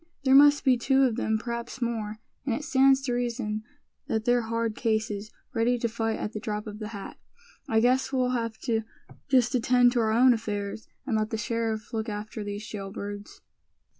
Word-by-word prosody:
"There 265 -1 +4
must 290 +1 +7
be 255 -2 +5
two 265 +3 +3
of 245 -4 +2
them, 220 -2 0
perhaps 235 +2 -5
more; 225 -3 -2 0.3
and 255 -5 0
it 300 - -5
stands 270 -1 +4
to 250 -3 -1
reason 235 -3 -2 0.5
that 220 0 -1
they're 245 0 +3
hard 230 -1 -2
cases, 220 -3 -1 0.2
ready 235 +2 +2
to 235 - 0
fight 225 -1 -2
at 210 - -4
the 215 - -4
drop 210 -1 -4
of 210 -1 -8
the 215 - -5
hat. 205 -3 -8 0.5
I 220 0 +3
guess 255 +3 +2
we'll 255 -2 +1
have 230 -3 -2
to 225 -3 0 0.5
just 255 -2 +3
attend 245 0 +4
to 240 - 0
our 220 -1 +2
own 245 +3 +6
affairs, 210 -2 -4 0.2
and 240 -5 0
let 215 0 0
the 225 - -2
sheriff 225 0 -2
look 220 0 -2
after 210 +1 -5
these 205 +1 -5
jail 195 -3 -6
birds." 205 0 -7
230 Hz, 195 wpm, -27 LUFS, 215-245 Hz, 0.5 s, must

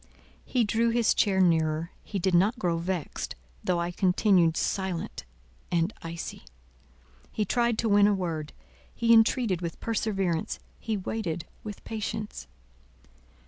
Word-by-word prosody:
He 250 -2 +1
drew 225 +2 +2
his 230 -1 +3
chair 195 -2 +2
nearer. 165 -2 +2
He 205 - -5
did 190 0 +1
not 200 +8 +4
grow 170 -4 0
vexed, 175 -2 -3 0.3
though 175 -1 +1
I 170 +1 -1
continued 180 -2 +3
silent 190 - -2 0.5
and 170 +4 +1
icy. 165 0 -6 0.9
He 210 - -1
tried 235 +2 +1
to 230 - 0
win 205 0 +6
a 210 - +4
word; 160 -5 -3 0.4
he 230 0 +4
entreated 225 -4 +4
with 170 -2 -5
perseverance, 195 -7 -1 0.2
he 220 -2 -2
waited 180 -4 -3 0.2
with 210 -2 -8
patience. 215 -1 -4
190 Hz, 135 wpm, -28 LUFS, 170-220 Hz, 0.9 s, win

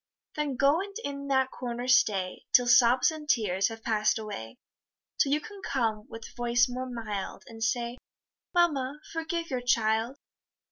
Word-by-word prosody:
Then 295 -3 -1
go, 280 +5 +3
and 400 0 -7
in 280 0 -5
that 265 -1 +2
corner 245 0 -5
stay, 200 -7 +2
Till 245 - +6
sobs 245 +2 +5
and 305 -2 -9
tears 200 -6 +2
have 225 0 -8
pass'd 215 -1 +2
away; 205 - -7 0.6
Till 275 - +3
you 295 - +3
can 405 +3 -11
come 225 - -1
with 225 0 -10
voice 240 0 +3
more 255 +1 -5
mild, 215 -5 -5
And 225 -1 -7
say, 235 +1 -1 0.5
"Mamma, 300 -5 +1
forgive 330 0 -3
your 255 -1 -1
child." 230 +1 +1
245 Hz, 155 wpm, -28 LUFS, 225-280 Hz, 0.6 s, Till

